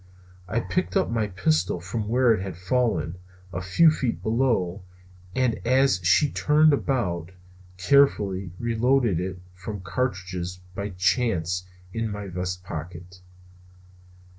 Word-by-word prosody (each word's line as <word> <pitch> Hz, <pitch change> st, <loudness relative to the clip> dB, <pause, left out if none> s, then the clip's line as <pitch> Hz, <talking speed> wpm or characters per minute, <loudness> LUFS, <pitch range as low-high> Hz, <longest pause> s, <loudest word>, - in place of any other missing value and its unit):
I 110 Hz, +5 st, 0 dB
picked 185 Hz, -, -1 dB
up 190 Hz, -, +1 dB
my 110 Hz, -2 st, 0 dB
pistol 90 Hz, -3 st, 0 dB
from 105 Hz, +5 st, -4 dB
where 120 Hz, +1 st, +4 dB
it 105 Hz, -, -2 dB
had 95 Hz, -3 st, -6 dB
fallen, 90 Hz, -3 st, 0 dB, 0.3 s
a 90 Hz, -, -3 dB
few 125 Hz, -, +5 dB
feet 130 Hz, -6 st, -2 dB
below, 110 Hz, -6 st, +1 dB, 0.5 s
and 125 Hz, -3 st, +1 dB
as 130 Hz, -3 st, +3 dB
she 120 Hz, -, +3 dB
turned 155 Hz, 0 st, +4 dB
about, 90 Hz, -, -1 dB, 0.5 s
carefully 100 Hz, -6 st, +3 dB
reloaded 120 Hz, -3 st, +2 dB
it 90 Hz, 0 st, -4 dB
from 95 Hz, +2 st, -7 dB
cartridges 90 Hz, -3 st, -3 dB
by 100 Hz, +2 st, -4 dB
chance 90 Hz, -2 st, 0 dB, 0.3 s
in 115 Hz, -1 st, -2 dB
my 105 Hz, -1 st, -5 dB
vest 90 Hz, 0 st, -4 dB
pocket. 90 Hz, +2 st, -8 dB
100 Hz, 125 wpm, -25 LUFS, 90-125 Hz, 0.5 s, few